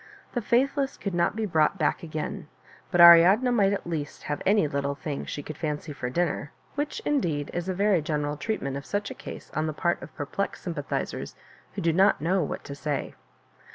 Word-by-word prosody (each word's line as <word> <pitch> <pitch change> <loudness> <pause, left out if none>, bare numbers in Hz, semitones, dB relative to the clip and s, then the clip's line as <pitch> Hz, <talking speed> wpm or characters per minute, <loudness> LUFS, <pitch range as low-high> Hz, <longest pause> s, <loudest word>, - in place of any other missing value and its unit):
The 245 - -1
faithless 270 +5 +1
could 200 - -4
not 175 +3 +1
be 220 -1 -1
brought 160 -1 +2
back 155 +1 +1
again; 155 -3 -5 0.4
'but 180 - 0
Ariadne 175 +8 +8
might 200 -5 +3
at 200 - -2
least 160 -4 -4
have 145 - -3
any 205 -5 +4
little 140 0 -2
thing 145 -1 -5
she 145 - -5
could 155 +1 -8
fancy 150 -1 -3
for 125 -3 -4
dinner, 160 0 -1 0.2
which, 290 +1 -3
indeed, 165 - 0
is 175 +1 -3
a 185 - -1
very 200 -2 +3
general 150 -1 -1
treatment 145 -7 -3
of 140 - -8
such 205 0 -2
a - - -4
case - - -9
on 155 +1 0
the 155 - -2
part 175 +3 0
of - - -11
perplexed 155 +7 -3
sympathizers 165 -6 -4 0.4
who - - -3
do 165 -1 +3
not 195 +4 +4
know 180 +5 +1
what 150 - -4
to 140 - -7
say. 145 -1 -3
170 Hz, 200 wpm, -27 LUFS, 150-200 Hz, 0.4 s, Ariadne